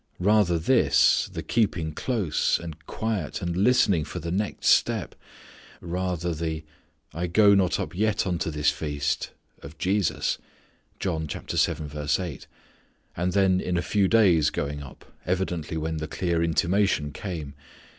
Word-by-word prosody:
Rather 100 -2 +3
this, 80 - +3
the - - -5
keeping 90 -9 0
close, 100 - 0
and 80 -2 -9
quiet 110 -7 -3
and 85 -3 -3
listening 100 -5 +3
for 85 - -7
the 85 0 -5
next 100 +3 -2
step. - - +2 0.7
Rather 90 -1 -2
the 80 -1 -3 0.5
"I 85 +3 -2
go 100 +4 +5
not 95 -3 +2
up - - -4
yet 110 +2 +1
unto 90 -3 -1
this 75 -2 +1
feast" 75 -1 -2 0.3
of 75 +3 -11
Jesus. 95 -2 0 0.7
And 80 -4 -1 2.0
then 95 -1 +3
in 90 -1 -1
a - - +1
few 100 +1 +2
days 90 -9 +4
going 75 -1 -3
up, 70 -2 -12 0.2
evidently 90 -3 -2
when 80 +1 -2
the 80 0 -4
clear 85 -2 -1
intimation 85 -1 +1
came. 80 -8 -6
85 Hz, 130 wpm, -26 LUFS, 80-100 Hz, 2.0 s, go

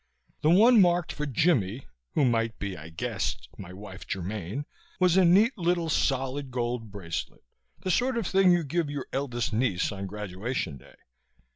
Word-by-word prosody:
The 155 - +3
one 220 +6 +7
marked 175 -2 +2
for 150 - -3
"Jimmie" 130 - +1 0.3
who 145 - +4
might 115 -2 +1
be, 100 -2 -4
I 80 0 -10
guessed, 60 -6 -3
my 90 -2 -8
wife 95 0 -10
Germaine 100 - -4 0.3
was 180 -2 +4
a 190 - +6
neat 200 +9 +5
little 170 -1 +1
solid 135 -1 0
gold 120 -2 -3
bracelet, 95 -5 -6 0.4
the 185 - -1
sort 250 +5 +1
of 230 - -1
thing 190 0 +4
you 175 -1 +3
give 160 +1 -1
your 145 -2 -4
eldest 120 -5 -2
niece 110 -6 +1
on 100 -1 -5
graduation 100 - -4
day. 65 - -18
130 Hz, 165 wpm, -27 LUFS, -, 0.4 s, one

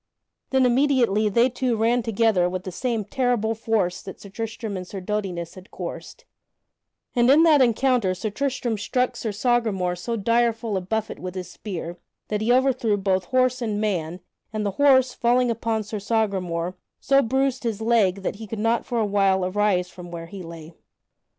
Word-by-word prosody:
Then 265 -1 +3
immediately 245 -5 +3
they 235 +4 +4
two 250 -1 -1
ran 235 +3 +2
together 220 -5 +2
with 185 0 -4
the 185 - -6
same 230 +1 -2
terrible 245 -2 0
force 220 -5 -1
that 190 - -9
Sir 200 - -11
Tristram 225 +1 -5
and 180 -1 -6
Sir 195 - -6
Dodinas 185 -4 -3
had 185 +1 -13
coursed, - - -8 0.9
and 240 0 +4
in 300 +4 +7
that 310 -4 +6
encounter 240 -5 +2
Sir 215 +3 -4
Tristram 250 -2 -2
struck 250 +4 0
Sir 220 - -3
Sagramore 205 -5 0
so 230 +7 -4
direful 230 0 +1
a 190 - 0
buffet 220 +4 -3
with 185 0 -6
his 180 -2 -6
spear 175 -4 -6 0.3
that 210 0 -1
he 225 +2 +2
overthrew 250 -4 +2
both 190 -2 0
horse 255 +1 +1
and 215 -3 -1
man, 180 -4 -2 0.3
and 215 -2 -3
the 200 - 0
horse, 260 -3 +5
falling 245 +1 +2
upon 225 -1 -1
Sir 210 +1 -5
Sagramore, 190 -5 -1 0.2
so 275 0 +3
bruised 265 +1 0
his 225 -3 -2
leg 215 -4 +2
that 195 - -3
he 220 0 -8
could 225 - -5
not 225 +2 0
for 240 - -2
a 220 - +2
while 195 -2 +2
arise 185 -2 +1
from 175 -1 -10
where 170 -1 -7
he 195 +2 -9
lay. 165 -1 -10
220 Hz, 180 wpm, -24 LUFS, 190-240 Hz, 0.9 s, in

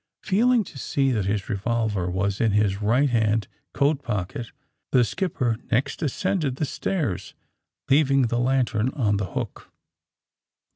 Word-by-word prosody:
'' - - -63
^ - - -15
Feeling 235 +4 +4
to 150 -7 -11
see 135 +1 +1
that 105 -6 0
his 100 0 -1
revolver 105 -3 -1
was 95 +2 -1
in 110 -3 +2
his 105 -1 +1
right 125 +6 +3
hand 110 -2 +1 0.2
coat 145 0 +1
pocket, 105 -1 -4 0.4
the 125 -2 +5
skipper 120 - -1
next 130 +4 0
ascended 150 -1 -1
the 150 - -1
stairs, 125 - -3 0.5
leaving 140 -1 +4
the 120 0 0
lantern 125 -2 +1
on 105 -8 +1
the 100 -3 -4
hook. - - -5
120 Hz, 150 wpm, -24 LUFS, 105-140 Hz, 0.5 s, the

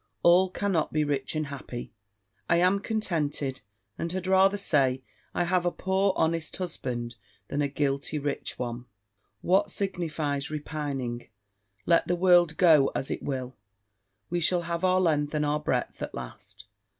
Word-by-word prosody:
All 180 +2 +6
cannot 185 -4 0
be 155 0 +1
rich 145 -1 -2
and 155 0 0
happy. 135 -4 -7 0.6
I - - +5
am 180 +3 +3
contented, 150 - -2 0.4
and 170 - -2
had 185 0 -3
rather 190 +1 +4
say, 135 -9 +2 0.3
I - - +2
have 175 0 +1
a 175 - +2
poor 190 +1 +1
honest 160 -1 0
husband, 120 -9 -4 0.3
than 145 - -1
a 145 - +2
guilty 140 +1 -1
rich 145 -1 -3
one. 120 0 -4 0.6
What 195 +3 +3
signifies 155 -8 -2
repining: 145 -5 -4 0.6
let 170 -1 +3
the 175 - +2
world 175 -2 +4
go 160 -7 +6
as 135 - -2
it - - -3
will, 130 -2 -4 0.8
we 175 - +1
shall 175 +1 +1
have 170 +1 -3
our 185 0 +4
length 150 -4 +1
and 150 0 +1
our 150 +1 +1
breadth 125 -5 -2
at - - -5
last. 65 -1 -10
155 Hz, 155 wpm, -28 LUFS, 140-180 Hz, 0.8 s, All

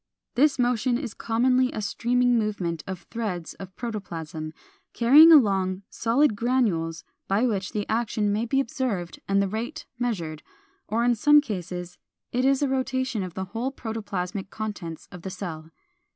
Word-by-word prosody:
This 285 +3 +3
motion 245 -1 +1
is 250 -5 -5
commonly 250 +3 +2
a - - -4
streaming 245 +3 +1
movement 195 -8 -1
of 190 -1 -5
threads 205 -8 -3
of 190 -2 -9
protoplasm, 165 -9 -5 0.4
carrying 290 +8 +8
along 195 - +4
solid 245 +2 +2
granules 205 -9 0 0.2
by 205 +5 +2
which 200 -5 -1
the 205 -1 -2
action 220 -2 0
may 220 +3 -1
be 270 +3 +2
observed 230 -9 -2
and 195 0 +3
the - - 0
rate 235 - -4
measured, 170 -11 -2 0.5
or 225 +3 0
in 240 0 +4
some 295 +6 +6
cases 180 - -5 0.3
it 250 +1 +1
is 275 +1 +3
a - - +3
rotation 260 -3 -1
of 185 -2 -6
the 190 - -3
whole 245 +4 -1
protoplasmic 205 -6 -4
contents 205 -8 -6
of 180 - -10
the 190 - -5
cell. 165 -4 -6
220 Hz, 155 wpm, -26 LUFS, 185-250 Hz, 0.5 s, carrying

